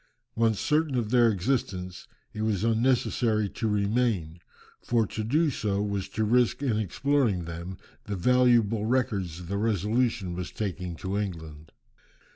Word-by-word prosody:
Once 115 -3 +2
certain 150 - +1
of 115 -3 -1
their 120 -2 +5
existence, 95 -4 -2 0.3
it 110 - -5
was 110 -3 0
unnecessary 115 -2 +1
to 110 - -3
remain, 100 -5 0 0.4
for 115 -2 +1
to 110 +2 -5
do 150 +7 +2
so 100 -5 -1
was 100 -2 -2
to 110 - -2
risk 120 +5 +2
in 115 -6 +1
exploring 115 - 0
them 85 +3 -7 0.3
the 105 - -3
valuable 115 0 +3
records 100 -9 -1
the 100 +3 -3
Resolution 110 -1 0
was 90 0 -5
taking 90 -4 -4
to 95 +4 -3
England. 80 -6 -6
105 Hz, 140 wpm, -27 LUFS, 95-120 Hz, 0.4 s, their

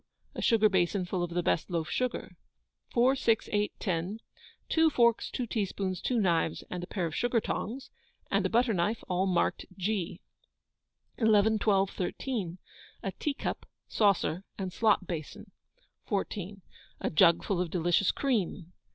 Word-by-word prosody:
A - - -5
sugar 220 -3 +5
basin 190 -1 +1
full 180 0 -2
of 175 - -1
the 175 +1 -1
best 175 - 0
loaf 165 -3 -1
sugar. 250 +4 -2 0.6
4, 250 +3 +4
6, 230 -4 +1
8, 210 0 +1
10. 185 +2 -2 0.5
Two 320 0 +4
forks, 235 -5 +3
two 250 - -3
teaspoons, 195 -4 -2
two 245 -2 0
knives, 170 -5 +1
and 180 -1 -4
a - - -6
pair 185 -4 -2
of 160 - -4
sugar 245 -1 +2
tongs, 255 +4 -4 0.4
and - - +2
a - - +1
butter 235 0 +3
knife 205 +5 0
all 185 +1 +1
marked 180 -2 0
G. 195 -2 -2 1.0
11, 220 -1 +4
12, 195 -2 +2
13. 185 -1 -3 0.5
A 195 - -2
teacup, 280 +7 -3 0.2
saucer, 195 -4 +2
and 190 -2 -4
slop 210 -3 +3
basin. 165 -4 -6 0.6
14. 200 -1 -3 0.4
A - - -1
jug 170 +1 +5
full 185 -3 0
of 180 - -2
delicious 175 +3 +2
cream. 195 - -1
195 Hz, 150 wpm, -30 LUFS, 175-225 Hz, 1.0 s, sugar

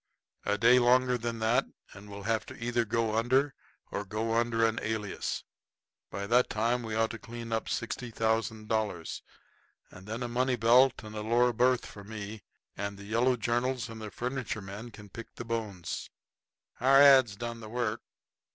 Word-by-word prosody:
"A 105 0 +1
day 120 +3 +6
longer 125 +1 +4
than 115 -1 -3
that 110 +2 +2 0.3
and 105 +1 -12
we'll 100 0 -8
have 110 +1 0
to - - -9
either 120 0 0
go 115 0 0
under 130 +5 +2 0.4
or 100 - -2
go 110 +3 -2
under 115 0 +2
an 115 0 +1
alias. 105 -2 -3 0.7
By 100 +1 -4
that 120 +4 +3
time 115 +3 +1
we 110 -2 -4
ought 110 0 +1
to 115 - -7
clean 115 0 -8
up 115 0 0
$60,000. 110 -5 -2 0.7
And 95 +2 -13
then 110 +3 -4
a - - -2
money 125 +2 +1
belt 120 +3 +4
and 110 0 -9
a 105 - -3
lower 120 +3 +3
berth 125 +2 +2
for 100 - -10
me, 105 0 -7 0.3
and 100 0 -4
the 100 - -10
yellow 120 +4 +2
journals 120 0 -1
and 110 -1 -8
the 105 - -5
furniture 125 +3 -3
men 100 +4 -8
can 105 -2 -12
pick 115 +4 -10
the 120 - -7
bones." 105 -7 -4 0.7
Our 135 +2 +6
ads. 135 -6 +7
done 115 +2 -5
the 110 -1 -9
work. 120 -2 -2
115 Hz, 175 wpm, -30 LUFS, 105-120 Hz, 0.7 s, ads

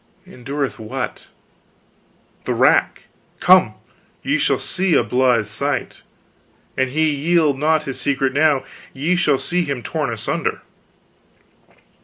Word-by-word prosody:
"Endureth 135 +1 -5
what?" 110 -1 -6 1.2
"The - - -1
rack. - - +2 0.4
Come - - +5 0.5
ye - - 0
shall - - +2
see 185 -3 0
a 120 - +4
blithe 125 0 +2
sight. 105 - -3 0.7
An 130 - +1
he 155 +4 +1
yield 150 -1 +1
not 155 +1 +2
his 135 -3 -6
secret 135 -1 0
now, 145 -2 +2 0.3
ye 155 +7 0
shall 150 -6 +2
see 175 +6 -1
him 140 -6 -4
torn 150 -6 -2
asunder." 115 -2 -3
140 Hz, 120 wpm, -20 LUFS, 130-155 Hz, 1.2 s, Come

